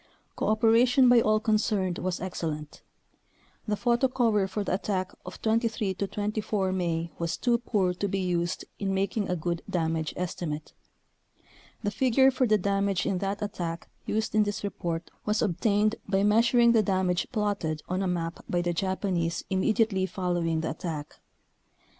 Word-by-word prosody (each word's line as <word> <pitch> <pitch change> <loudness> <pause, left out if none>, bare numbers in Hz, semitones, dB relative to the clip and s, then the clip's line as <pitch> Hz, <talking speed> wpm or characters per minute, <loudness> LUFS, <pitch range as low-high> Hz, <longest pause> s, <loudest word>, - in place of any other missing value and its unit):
Cooperation 235 +4 +4
by 245 -1 +7
all 215 0 +3
concerned 210 -4 0
was 185 -1 -2
excellent. 155 -5 -5 0.9
The 210 - +1
photo 240 +4 +2
cover 225 -6 +2
for 200 +2 -3
the - - -2
attack 185 -1 -1 0.2
of - - -8
23 220 -3 +1
24 205 0 -2
May 170 -3 -1
was 170 -1 -1
too 240 -1 +2
poor 200 -6 0
to 200 +3 -2
be 195 - -1
used 175 -2 -1
in 195 -1 -1
making 200 +2 -1
a 180 - +1
good 170 0 -2
damage 160 -2 -1
estimate. 165 -4 -4 1.1
The 205 - 0
figure 265 +4 +4
for 255 -1 +1
the 215 -1 +4
dam 200 +1 0
age 190 -2 0
in 185 - 0
that 200 +2 -2
attack 175 -5 -4 0.2
used 220 +1 -1
in 215 - +4
this 205 0 -1
report 170 -4 -4
was 210 +1 0
obtained 210 +3 +1
by 195 0 +2
measuring 235 +3 +5
the 225 -2 +5
damage 185 -3 0
plotted 200 -9 -1
on 185 +1 -1
a 190 - 0
map 170 -2 -3
by 175 0 +1
the 175 0 0
Japanese 180 -2 -1
immediately 190 0 +2
following 175 -4 -1
the 160 - -2
attack. 155 -3 -6
195 Hz, 160 wpm, -28 LUFS, 175-215 Hz, 1.1 s, by